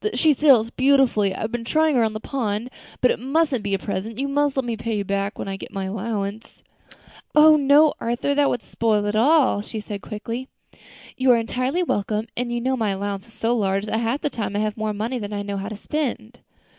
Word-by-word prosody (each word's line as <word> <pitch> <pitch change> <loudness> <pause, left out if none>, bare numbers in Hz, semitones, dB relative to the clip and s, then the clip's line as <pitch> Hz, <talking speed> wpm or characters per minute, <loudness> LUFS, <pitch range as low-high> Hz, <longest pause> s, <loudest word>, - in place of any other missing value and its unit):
She 315 -2 +4
sails 255 -6 +4
beautifully. 260 -7 +3
I've 220 +3 -3
been 240 -1 -3
trying 310 +4 +2
her 240 - +4
on 220 -1 0
the 215 - -4
pond. 230 -1 -3 0.3
But 250 - +5
it - - -2
mustn't 275 0 +1
be 200 -1 0
a - - 0
present; 200 +3 -4
you 275 +2 -1
must 285 0 0
let 265 - 0
me 235 -1 -2
pay 225 0 -3
you 200 - -1
back 200 +1 -2
when - - -5
I 195 0 -4
get - - -10
my 195 -1 -4
allowance." 205 +1 -4 0.7
"Oh! 310 +1 +8
no, 290 +1 +5
Arthur, 240 +4 -1
that 285 0 +3
would 245 - -2
spoil 215 -3 0
it 205 +1 -1
all," 265 -1 +4
she 220 +1 -8
answered 210 -2 -6
quickly; 230 +6 -6 0.7
"you 260 0 +2
are 245 - +7
entirely 255 +8 -1
welcome, 210 - -1
and 245 0 -2
you 240 - -1
know 260 +2 0
my 225 -4 0
allowance 200 +1 -3
is 225 - -17
so 230 +2 0
large 195 -2 0
that 220 +1 -1
half 235 +5 -1
the 295 - -1
time 210 -3 -4
I - - +1
have 215 -1 -1
more 215 -1 -2
money 225 +5 -3
than 205 -1 -5
I 205 0 -3
know 200 0 -4
how 195 +2 -4
to 215 - -7
spend." 245 -4 -4
230 Hz, 230 wpm, -23 LUFS, 205-265 Hz, 0.7 s, Oh